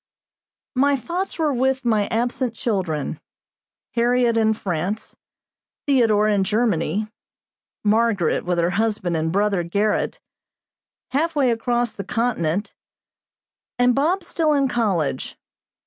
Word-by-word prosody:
My 280 +2 +3
thoughts 345 - -4
were 310 -3 +1
with 265 +1 0
my 215 -3 +2
absent 240 +1 -1
children 180 - -2 0.7
Harriot 240 0 +2
in 220 -1 +3
France, 190 +2 -3 0.7
Theodore 225 -7 +3
in 205 -2 +2
Germany, 210 -2 0 0.8
Margaret 215 -5 +2
with 175 0 -1
her 170 +1 +2
husband 205 -3 0
and 160 0 0
brother 200 -1 +1
Gerrit, 200 +5 0 0.9
halfway 285 -2 +1
across 240 0 0
the 200 - -6
continent, 205 -4 -1 1.0
and 245 0 +4
Bob 335 +8 +1
still 320 -2 +1
in 280 -2 +2
college. 185 - -1
225 Hz, 110 wpm, -22 LUFS, 195-250 Hz, 1.0 s, and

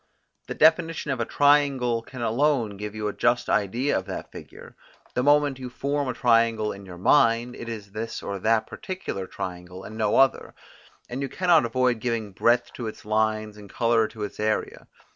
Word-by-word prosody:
The - - -5
definition 160 -1 +3
of 130 - -2
a 115 - 0
triangle 140 -5 +3
can 120 +1 -8
alone 120 -2 +1
give 105 +1 -6
you 105 -1 -3
a 105 - -3
just 120 0 +1
idea 115 +7 +1
of 95 - -1
that 95 - -6
figure: - - -12 0.4
the 125 - 0
moment 145 0 +3
you 130 -1 -6
form 140 +3 -2
a 125 - -1
triangle 115 -3 +2
in 100 0 -10
your 90 -1 -9
mind, 115 +3 +3
it 120 - -7
is 105 -3 -7
this 110 +2 -5
or 100 -1 -4
that 110 +2 +2
particular 185 - -6
triangle 90 -1 -7
and 110 - -9
no 110 - +1
other, 135 0 +2 0.5
and 125 +3 -5
you 135 - -3
cannot 175 -5 +3
avoid 125 0 +1
giving 115 -3 -2
breadth 120 +5 +1
to 120 - -5
its 110 - -9
lines 110 0 0
and 105 -1 -12
colour 115 0 +2
to 110 -1 -8
its 105 - -6
area. 110 0 -2
115 Hz, 190 wpm, -25 LUFS, 105-130 Hz, 0.5 s, definition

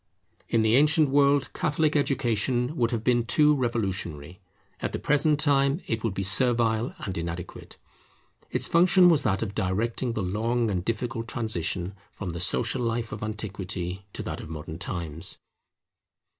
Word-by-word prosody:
In 115 -1 +2
the 110 +1 +4
ancient 150 +1 +4
world 140 0 +3
Catholic 155 0 0
education 125 -1 0
would 120 -5 +1
have 115 -2 -2
been 120 -1 +3
too 150 +5 +4
revolutionary; 95 - -3 0.4
at - - -3
the - - -1
present 150 +1 +2
time 140 0 +3
it 115 -1 -3
would 110 -5 -1
be 100 - -2
servile 115 +3 +2
and 95 - -5
inadequate. 85 +1 -6 0.7
Its - - +1
function 180 +1 +5
was 160 -4 +4
that 100 -3 0
of 100 -3 -5
directing 115 +6 -1
the 110 - -2
long 115 +4 0
and 90 -3 -1
difficult 115 +2 -3
transition 95 -6 -2 0.2
from 90 -3 -5
the 85 - -6
social 125 +8 0
life 115 -1 -2
of 110 - -6
Antiquity 95 -4 -4
to - - -5
that - - -5
of - - -9
Modern 80 +1 -7
times. 85 -5 -3
115 Hz, 155 wpm, -26 LUFS, 95-135 Hz, 0.7 s, function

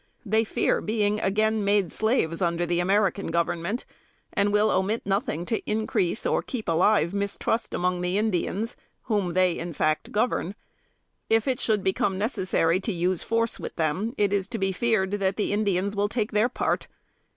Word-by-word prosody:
They 220 +2 +2
fear 220 - 0
being 210 -1 0
again 215 +2 +1
made 200 -3 +2
slaves, 220 -8 0
under 170 -1 +1
the 175 0 0
American 200 +2 +1
Government, 170 +6 -1 0.5
and 205 -2 +2
will 210 +1 +3
omit 200 +5 0
nothing 200 - -1
to 225 - -1
increase 215 -2 0
or - - +2
keep 240 -4 -6
alive 170 +1 +3
mistrust 200 +3 -1
among 180 0 0
the 180 +2 0
Indians, 215 +1 -1 0.3
whom 205 -7 0
they, 185 -2 +2
in 170 0 -5
fact, 155 +1 0
govern. 210 -3 0 0.7
If 225 +1 +2
it 260 -1 0
should 215 -6 +1
become 190 0 0
necessary 190 -5 +1
to 215 - -2
use 180 0 0
force 230 0 0
with - - -6
them, 180 - -1
it 205 -1 +2
is 200 -1 +1
to 230 - -4
be 195 -2 0
feared 195 -1 +1
that 195 -2 0
the 210 - 0
Indians 200 -1 0
will 205 +1 +1
take 220 -1 -2
their 215 +3 +2
part. - - -1
200 Hz, 175 wpm, -26 LUFS, 180-220 Hz, 0.7 s, will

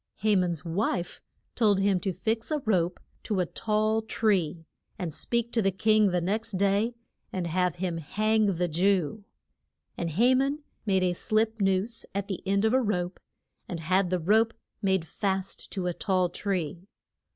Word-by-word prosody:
Ha 215 -1 +4
man's 175 -5 0
wife 175 0 -1 0.3
told 210 -4 +3
him 195 -1 +2
to 190 - -1
fix 220 +5 -2
a 305 - +1
rope 180 -5 +1 0.2
to 210 -4 -1
a 180 - +2
tall 215 +3 0
tree, 185 -8 0 0.3
and 175 -5 -4
speak 235 +6 -1
to 230 - +2
the 195 - +3
king 215 +2 +3
the 180 -1 +1
next 215 +6 -1
day 200 +5 +1 0.4
and 185 -2 -2
have 180 0 0
him 175 -2 -2
hang 215 +7 +1
the 180 -2 +1
Jew. 185 +2 +1 0.7
And 170 - -2
Ha 240 +9 +4
man 275 +3 +1 0.2
made 190 -2 +3
a 180 -1 +2
slip 220 +4 0
noose 195 +4 0
at 200 0 -2
the 195 -3 -4
end 200 +2 +2
of 220 - +2
a 260 - +4
rope, 180 -5 -1 0.5
and 175 - -4
had 185 +3 +1
the 185 - +1
rope 220 +7 +3 0.3
made 190 -4 +1
fast 195 +2 -3
to 190 -3 -2
a 180 - 0
tall 185 -1 +1
tree. 180 -2 -3
195 Hz, 175 wpm, -28 LUFS, 180-215 Hz, 0.7 s, Ha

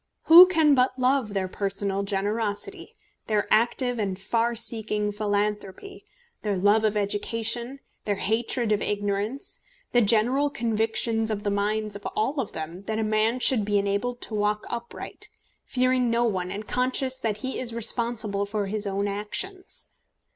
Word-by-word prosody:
Who 345 +3 +10
can 320 -5 +4
but 255 0 +2
love 255 -4 +1
their 190 -1 0
personal 195 0 -2
generosity, 205 - -3 0.3
their 210 -2 +1
active 240 +2 +2
and 195 -3 -2
far 230 +4 0
seeking 220 -2 -1
philanthropy, 205 - -3 0.4
their 205 -3 -1
love 205 +4 +3
of 215 -1 +1
education, 230 +5 -1 0.3
their 205 - 0
hatred 225 +3 0
of 210 - +1
ignorance, 205 +5 -3 0.3
the 245 - +4
general 240 +7 +3
convictions 225 -2 0
in 210 -1 -3
the 205 - 0
minds 210 +1 -1
of 200 - -6
all 265 +7 0
of 245 - -3
them 160 +3 -6
that 220 +1 -2
a 220 - 0
man 215 +3 +1
should 250 -3 +4
be 205 0 +1
enabled 200 +5 -1
to - - -4
walk 210 0 0
upright, 235 0 -6 0.4
fearing 255 -1 +1
no 235 +1 +2
one 185 -5 -1
and 205 +3 -6
conscious 260 +1 0
that 220 -5 -2
he 260 - -3
is 245 -2 +2
responsible 230 -3 -1
for 205 0 -2
his 205 +1 -2
own 200 +1 -1
actions? 215 - -4
215 Hz, 155 wpm, -25 LUFS, 205-240 Hz, 0.4 s, Who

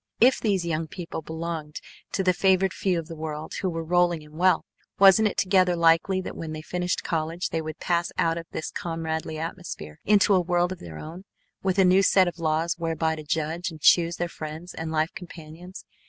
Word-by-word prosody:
If 250 +2 +5
these 195 -5 0
young 160 -1 -2
people 170 -1 -6
belonged 160 -1 -5 0.3
to 190 - 0
the 185 0 +3
favored 190 +1 +2
few 185 -3 0
of 165 - -3
the 165 - -8
world 155 -1 -6
who 190 - 0
were 165 -1 -3
rolling 175 -1 +2
in 150 0 -16
wealth, 180 0 +3 0.3
wasn't 200 +2 +7
it 205 - -2
altogether 185 -2 +3
likely 170 +3 +3
that - - -7
when 160 -1 -6
they 155 0 -6
finished 180 +2 -2
college 165 +3 -2
they 165 - -2
would 155 0 -6
pass 170 -1 0
out 165 0 +2
of 165 0 -6
this 155 - -5
comradely 160 -1 -4
atmosphere 160 - -6
into 205 0 +4
a 185 - +4
world 175 0 +1
of 185 - -6
their 80 -2 -9
own, 170 - -9 0.4
with 190 0 0
a 190 - +5
new 185 +2 +5
set 190 -1 +4
of 175 - -5
laws 165 +1 0
whereby 160 -1 0
to 155 - -7
judge 160 +4 -2
and 160 -2 -11
choose 170 +2 +4
their 175 - -2
friends 155 +3 -8
and 160 0 -5
life 160 +1 0
companions? 175 -1 -10
170 Hz, 210 wpm, -25 LUFS, 160-185 Hz, 0.4 s, wasn't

